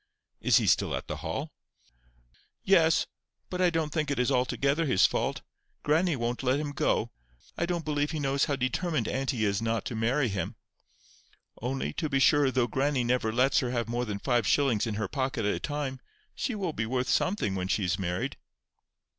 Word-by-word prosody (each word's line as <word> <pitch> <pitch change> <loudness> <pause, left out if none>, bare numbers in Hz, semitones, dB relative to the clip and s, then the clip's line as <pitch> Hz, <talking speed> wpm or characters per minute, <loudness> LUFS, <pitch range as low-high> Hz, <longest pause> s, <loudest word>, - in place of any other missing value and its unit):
"Is - - +4
he - - +2
still - - +2
at - - -5
the - - -5
Hall?" - - -4 1.1
"Yes. 165 -5 +4 0.5
But 180 0 -2
I 180 - +5
don't 160 -3 -1
think 155 -3 0
it 140 - -1
is 125 0 +1
altogether 140 +5 +1
his 95 -8 +5
fault. - - -1 0.4
Grannie 160 +2 +2
won't 120 -1 -2
let 130 +1 +1
him 150 -1 -3
go. 145 - 0 0.4
I 170 - -1
don't 170 -2 -2
believe 145 -1 0
he 160 - -3
knows 140 -1 +1
how 145 - 0
determined 140 +6 -1
auntie 130 -4 -1
is 100 +1 0
not 115 0 -1
to 120 - -4
marry 125 +5 +1
him. 95 -5 -3 1.1
Only, 130 +3 -2
to 155 - -2
be 135 - +1
sure, 145 +1 +4
though 130 -2 +2
grannie 135 +2 0
never 120 -2 +1
lets 125 +4 +3
her 125 - -1
have 120 -2 -1
more 120 +1 -1
than 105 -3 -3
five 120 0 +1
shillings 125 -6 +2
in 110 - -2
her 110 -1 -2
pocket 130 -1 -2
at 105 - +2
a - - -3
time, 145 -3 -3 0.3
she 250 - -2
will 185 -6 -2
be 110 -4 -2
worth 125 +1 -1
something 180 - +1
when 90 -1 -2
she 100 - 0
is 90 +1 0
married." 90 -1 -2
130 Hz, 195 wpm, -28 LUFS, 115-150 Hz, 1.1 s, I